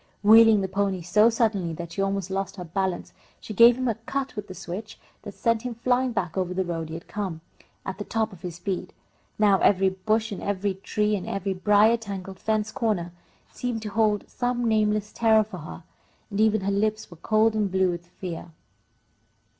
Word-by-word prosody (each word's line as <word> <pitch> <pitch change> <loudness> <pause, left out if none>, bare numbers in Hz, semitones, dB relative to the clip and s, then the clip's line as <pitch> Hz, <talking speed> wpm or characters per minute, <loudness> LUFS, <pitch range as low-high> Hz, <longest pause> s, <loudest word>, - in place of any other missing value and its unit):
Wheeling 220 0 +7
the 190 - -1
pony 190 -1 -1
so 210 +6 +4
suddenly 215 -7 0
that 170 +1 -7
she 195 - -3
almost 195 -1 -1
lost 195 -1 -3
her 180 - -6
balance, 185 +1 -3 0.3
she 215 - -8
gave 235 +4 +7
him 255 0 -1
a 230 - +2
cut 265 +5 -4
with 210 -1 -5
the 185 - -9
switch 195 +6 -7 0.2
that - - -9
sent 230 -2 +1
him 245 -1 -5
flying 250 +2 +1
back 180 -7 -2
over 180 -1 -2
the 190 0 0
road 165 -2 -3
he 160 - -6
had 165 - -9
come, 190 -6 -4 0.4
at 190 - -5
the - - -3
top 220 -1 -2
of 175 - -14
his 175 -2 -6
speed. 185 +1 -4 0.4
Now 205 -2 +4
every 195 -1 +4
bush 215 +4 -1
and 200 - -5
every 200 0 -1
tree 210 +2 -1
and 190 - -5
every 195 0 -2
brier 210 +4 +4
tangled 195 -3 -7
fence 220 0 -1
corner 215 -9 -1 0.4
seemed 240 -3 -4
to 215 - -4
hold 210 -1 +1
some 245 -1 -1
nameless 215 -1 +1
terror 220 -1 +4
for 205 -4 -9
her, 160 +2 -9 0.5
and 200 +1 0
even 220 -1 +3
her 195 +1 -1
lips 215 +1 -1
were 175 - -12
cold 220 +5 +2
and 210 -3 0
blue 190 -1 +2
with 175 0 -7
fear. 175 -1 -7
205 Hz, 200 wpm, -25 LUFS, 185-220 Hz, 0.5 s, Wheeling